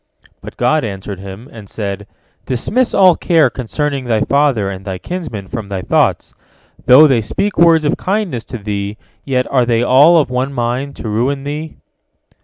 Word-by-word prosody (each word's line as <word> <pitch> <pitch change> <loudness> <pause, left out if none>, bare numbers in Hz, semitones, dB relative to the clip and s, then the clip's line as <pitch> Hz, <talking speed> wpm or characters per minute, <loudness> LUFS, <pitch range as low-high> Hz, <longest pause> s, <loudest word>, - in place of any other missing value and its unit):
'" - - -30
But - - -11
God 145 +6 +1
answered 100 -2 -6
him, 100 +5 -10
and 105 -4 -12
said: 100 -2 -5 0.4
"Dismiss 220 - 0
all 185 -3 +6
care 165 -3 +2
concerning 140 +2 -3
thy 110 -3 0
father 140 -7 +1
and 95 -1 -6
thy 95 -2 -5
kinsmen 140 - -6
from 110 0 -6
thy 95 -2 -5
thoughts. - - 0 0.5
Though 135 +5 +8
they 130 -6 +3
speak 200 - -2
words 165 -2 +4
of 145 - 0
kindness 190 - -2
to 125 - -7
thee, 100 -1 -4 0.3
yet 130 -2 0
are 130 -2 +3
they 120 -1 +1
all 140 +7 +5
of 150 -5 +1
one 130 +2 -2
mind, 125 +3 -3
to - - -7
ruin 125 +6 -1
thee." 150 +2 -6
125 Hz, 180 wpm, -16 LUFS, 105-150 Hz, 0.5 s, Though